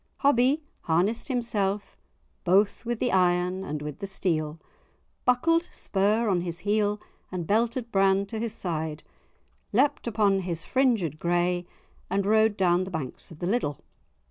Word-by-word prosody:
Hobbie 275 Hz, +2 st, +3 dB, 0.2 s
harnessed 185 Hz, +8 st, +1 dB
himself 210 Hz, -6 st, -1 dB, 0.5 s
"both 200 Hz, +5 st, +2 dB
with 240 Hz, -1 st, -1 dB
the 245 Hz, -, +1 dB
iron 180 Hz, 0 st, +2 dB
and 150 Hz, -5 st, -4 dB
with 150 Hz, +2 st, -6 dB
the 200 Hz, -, -4 dB
steel," 160 Hz, -5 st, -1 dB, 0.7 s
buckled 330 Hz, +8 st, +3 dB
spur 210 Hz, +4 st, +1 dB
on 185 Hz, -4 st, +2 dB
his 170 Hz, -1 st, -4 dB
heel 210 Hz, 0 st, +1 dB, 0.3 s
and 180 Hz, -2 st, -3 dB
belted 235 Hz, +4 st, 0 dB
brand 195 Hz, 0 st, +3 dB
to 225 Hz, -, -4 dB
his 230 Hz, -1 st, -2 dB
side, 160 Hz, -3 st, -3 dB, 0.7 s
leaped 260 Hz, +3 st, +2 dB
upon 205 Hz, -3 st, +2 dB
his 175 Hz, -3 st, -3 dB
"fringed 225 Hz, -, +1 dB
grey," 175 Hz, 0 st, 0 dB, 0.4 s
and 195 Hz, +1 st, 0 dB
rode 220 Hz, 0 st, +3 dB
down 180 Hz, -1 st, +3 dB
the 185 Hz, -, -6 dB
banks 155 Hz, -8 st, -5 dB
of 165 Hz, -, -12 dB
the 175 Hz, -, -4 dB
Liddel. 180 Hz, -, 0 dB
195 Hz, 145 wpm, -27 LUFS, 175-225 Hz, 0.7 s, Hobbie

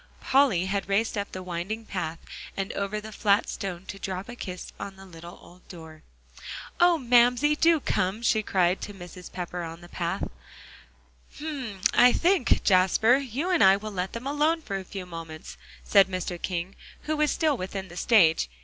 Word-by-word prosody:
Polly 260 Hz, -10 st, +3 dB
had 195 Hz, +1 st, -2 dB
raced 215 Hz, +3 st, +1 dB
up 200 Hz, -1 st, -3 dB
the 185 Hz, -, -6 dB
winding 185 Hz, +6 st, -4 dB
path, 170 Hz, -5 st, -4 dB, 0.4 s
and 195 Hz, 0 st, -3 dB
over 200 Hz, +1 st, -2 dB
the 215 Hz, +1 st, -9 dB
flat 205 Hz, 0 st, +2 dB
stone 190 Hz, -2 st, -5 dB
to 195 Hz, -, -8 dB
drop 190 Hz, +3 st, -5 dB
a 240 Hz, -, -7 dB
kiss 180 Hz, -6 st, -7 dB
on 195 Hz, -, -6 dB
the 190 Hz, 0 st, -13 dB
little 170 Hz, -1 st, -11 dB
old 180 Hz, +1 st, -18 dB
door. 160 Hz, -3 st, -11 dB, 0.8 s
"Oh! 350 Hz, 0 st, +6 dB
oh! -, -, -2 dB
Mamsie, 250 Hz, +2 st, +4 dB
do 330 Hz, +1 st, +4 dB
come!" 200 Hz, -3 st, -1 dB
she 220 Hz, -2 st, +3 dB
cried 185 Hz, -3 st, +1 dB
to 205 Hz, -, -7 dB
Mrs. 180 Hz, -1 st, -11 dB
Pepper 180 Hz, 0 st, -5 dB
on 165 Hz, 0 st, -7 dB
the 175 Hz, -, -12 dB
path. 175 Hz, +3 st, -3 dB, 1.1 s
"Hum! 265 Hz, -10 st, -5 dB
I 245 Hz, 0 st, +7 dB
think, 350 Hz, -5 st, +2 dB
Jasper, 190 Hz, +6 st, +4 dB
you 280 Hz, +6 st, -3 dB
and 355 Hz, -, +4 dB
I 190 Hz, 0 st, +7 dB
will 215 Hz, +1 st, -7 dB
let 185 Hz, -1 st, -3 dB
them 230 Hz, +2 st, -6 dB
alone 305 Hz, +3 st, +1 dB
for 195 Hz, -6 st, -3 dB
a -, -, -7 dB
few 185 Hz, 0 st, -7 dB
moments," 165 Hz, -2 st, -9 dB, 0.3 s
said 195 Hz, -2 st, +5 dB
Mr. 185 Hz, -2 st, -4 dB
King, 180 Hz, +1 st, -3 dB, 0.3 s
who 310 Hz, -, -1 dB
was 300 Hz, 0 st, +2 dB
still 310 Hz, -1 st, +1 dB
within 190 Hz, -1 st, -5 dB
the 175 Hz, -, -11 dB
stage. 175 Hz, -, +4 dB
195 Hz, 185 wpm, -26 LUFS, 180-245 Hz, 1.1 s, I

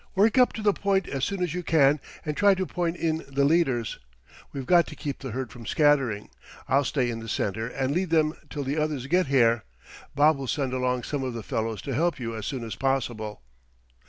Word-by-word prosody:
Work 215 Hz, +6 st, +4 dB
up 250 Hz, -, +5 dB
to 220 Hz, -, -6 dB
the 205 Hz, -1 st, +4 dB
point 195 Hz, -1 st, 0 dB
as 135 Hz, -2 st, -3 dB
soon 195 Hz, +1 st, -1 dB
as 175 Hz, -4 st, -2 dB
you 180 Hz, -, -2 dB
can 150 Hz, -3 st, +4 dB, 0.3 s
and 150 Hz, -1 st, -2 dB
try 200 Hz, +2 st, +5 dB
to 185 Hz, 0 st, -1 dB
point 175 Hz, -1 st, -2 dB
in 160 Hz, -2 st, -1 dB
the 140 Hz, 0 st, +1 dB
leaders. 135 Hz, -8 st, +1 dB, 0.5 s
We've 135 Hz, -2 st, -5 dB
got 175 Hz, +1 st, +5 dB
to -, -, -8 dB
keep 145 Hz, -3 st, -5 dB
the 135 Hz, -, -6 dB
herd 125 Hz, +1 st, -4 dB
from 115 Hz, -3 st, -10 dB
scattering. 135 Hz, -9 st, +2 dB, 0.4 s
I'll 140 Hz, +3 st, +3 dB
stay 125 Hz, -4 st, 0 dB
in 115 Hz, -, -5 dB
the 115 Hz, 0 st, -8 dB
center 110 Hz, +3 st, -1 dB
and 135 Hz, +2 st, -2 dB
lead 180 Hz, +2 st, 0 dB
them 155 Hz, -2 st, +3 dB, 0.2 s
till 145 Hz, -, -4 dB
the 140 Hz, +4 st, -1 dB
others 150 Hz, -4 st, -1 dB
get 180 Hz, +3 st, +2 dB
here. 115 Hz, -4 st, +3 dB, 0.5 s
Bob 150 Hz, +1 st, +5 dB
will 135 Hz, -, -4 dB
send 135 Hz, -1 st, -1 dB
along 125 Hz, -1 st, 0 dB
some 145 Hz, +1 st, -3 dB
of 130 Hz, -2 st, -3 dB
the 115 Hz, -, -5 dB
fellows 110 Hz, -2 st, -3 dB
to 135 Hz, -, -3 dB
help 165 Hz, +3 st, +1 dB
you 115 Hz, -2 st, -4 dB
as 110 Hz, -1 st, -5 dB
soon 130 Hz, -4 st, -3 dB
as 115 Hz, -, -5 dB
possible." 120 Hz, -, -2 dB
140 Hz, 225 wpm, -26 LUFS, 120-165 Hz, 0.5 s, up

